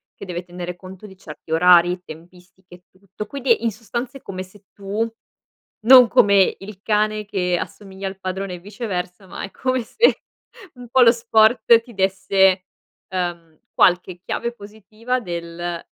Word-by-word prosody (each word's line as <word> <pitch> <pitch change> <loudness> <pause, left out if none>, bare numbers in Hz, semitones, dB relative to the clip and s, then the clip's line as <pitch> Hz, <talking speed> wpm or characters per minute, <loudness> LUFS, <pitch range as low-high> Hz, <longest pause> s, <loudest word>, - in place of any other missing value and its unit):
che - - -10
deve 175 -1 -5
tenere 175 0 -7
conto 185 +2 -12
di 190 -2 -13
certi 155 -2 -12
orari, 175 +1 +5
tempistiche 180 +2 -15
e 180 - -21 0.2
tutto. 200 +1 -8
Quindi, 240 -2 0
in 230 - +1
sostanza 235 +4 -6
è - - -18
come 185 -1 -6
se 190 +2 -19
tu 205 +3 -3 0.7
non 250 +2 +8
come 200 -3 +4
il 195 0 -11
cane 215 0 0
che 180 -3 -1
assomiglia 195 -1 -7
al 190 0 -8
padrone 190 0 -4
e 175 - -10
viceversa, 190 -2 -6
ma - - -8
è 195 - -7
come 255 -2 -2
se 445 - +2 0.5
un 245 -1 -12
pò 260 +1 +3
lo 230 - +7
sport 230 0 +4
ti 235 +1 -16
desse, 190 -1 +2 0.4
uhm, 170 -4 -5
qualche 180 0 +2
chiave 235 0 -3
positiva 220 +3 -5
del 170 -2 -5
195 Hz, 160 wpm, -21 LUFS, 180-220 Hz, 0.7 s, non